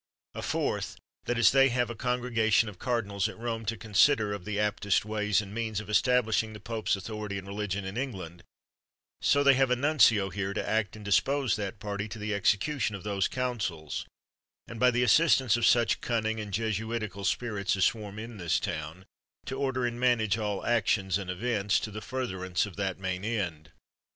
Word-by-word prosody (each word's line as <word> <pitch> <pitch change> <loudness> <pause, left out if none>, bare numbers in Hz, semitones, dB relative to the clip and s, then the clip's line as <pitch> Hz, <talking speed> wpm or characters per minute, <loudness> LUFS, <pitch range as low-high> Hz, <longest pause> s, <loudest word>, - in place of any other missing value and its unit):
A - - -5
fourth, - - -2 0.3
that 120 - -1
as 115 - +6
they 135 0 +5
have 120 -1 0
a - - -6
congregation 115 -2 +1
of 100 -4 -9
cardinals 105 -6 -1
at - - -10
Rome, 115 -1 -4
to 115 +1 -1
consider 110 +1 +3
of 100 -3 -7
the 105 -1 -3
aptest 105 -1 +1
ways 105 -1 +1
and 100 -1 -9
means 110 -2 -2
of 105 0 -7
establishing 110 -1 +2
the 105 - -9
pope's 110 +1 -1
authority 105 0 -5
and 95 - -7
religion 100 -1 -3
in 95 +2 -5
England, 95 -10 -5 0.8
so 145 0 +3
they 140 -1 +7
have 135 0 +3
a 125 - +3
nuncio 120 -8 +4
here, 100 0 -3
to - - -2
act 110 -2 0
and 105 -1 -11
dispose 130 +7 +2
that 105 0 -4
party 100 0 -4
to 110 - -8
the 105 0 -3
exe 100 +1 +3
cution 115 -1 -2
of 95 - -8
those 100 -2 0
counsels, 110 - -3 0.6
and, 115 - -8
by 125 - +5
the 125 0 +1
assistance 130 -3 +4
of 120 -1 +2
such 120 -1 +3
cunning 110 -2 -1
and 105 -1 -6
Jesuitical 110 -1 -2
spirits 100 -1 0
as 95 -2 +3
swarm 105 -2 -2
in 115 +1 -7
this 85 -4 0
town, 80 +5 -5 0.4
to 130 - -4
order 130 -3 0
and 120 0 -3
manage 115 -5 +2
all 105 -3 -3
actions 100 -5 +1
and 95 -2 -6
events, 105 +1 0
to 110 - -5
the 110 +1 -6
furtherance 95 -8 -2
of 100 - -10
that 95 -2 -2
main 95 -1 -3
end. 90 -9 -3
110 Hz, 195 wpm, -29 LUFS, 100-120 Hz, 0.8 s, they